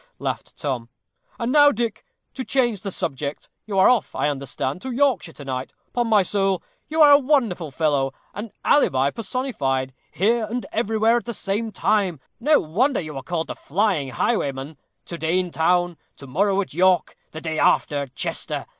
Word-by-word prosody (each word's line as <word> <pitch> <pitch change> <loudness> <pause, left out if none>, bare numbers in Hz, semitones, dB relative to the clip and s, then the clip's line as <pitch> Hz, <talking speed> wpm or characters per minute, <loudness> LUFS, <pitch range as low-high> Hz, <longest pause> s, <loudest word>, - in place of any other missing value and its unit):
laughed - - -5
Tom. 125 -5 -3 0.5
"And 235 +1 -1
now, 290 0 +7
Dick, 230 -2 -3 0.3
to 260 - -4
change 240 -7 +1
the 200 - -4
subject. 140 -5 -4 0.2
You 200 -2 -2
are 190 - +7
off, 245 -5 +2
I 150 - +1
understand, 140 +2 -3
to 260 - -5
Yorkshire 250 - +1
to 145 - -11
night. 130 -1 -4 0.2
'Pon 240 -1 +1
my 215 -3 +4
soul, 195 -1 0 0.3
you 315 0 +4
are 295 - +8
a 285 - +8
wonderful 240 - +1
fellow 140 -2 +1 0.2
an 205 +2 -6
alibi 140 - +3
personified! 145 - -2 0.2
here 225 +5 +1
and 235 +3 -4
everywhere 225 +1 +2
at 240 - -4
the 235 -1 -4
same 210 +4 -2
time 200 -8 +1 0.2
no 295 +5 +4
wonder 240 - +1
you 155 -3 -6
are 135 - -4
called 165 +4 -2
the - - -6
flying 180 -5 0
highwayman. 140 - -1 0.3
To 170 - -7
day 160 +3 +1
in 180 -1 -1
town 175 +1 +1 0.2
to 140 - -11
morrow 195 +9 +1
at 190 - -7
York 185 +2 +3
the 160 - -8
day 160 -1 -3
after 145 - +3
at 140 -3 -5
Chester. - - -3
190 Hz, 180 wpm, -23 LUFS, 150-230 Hz, 0.5 s, are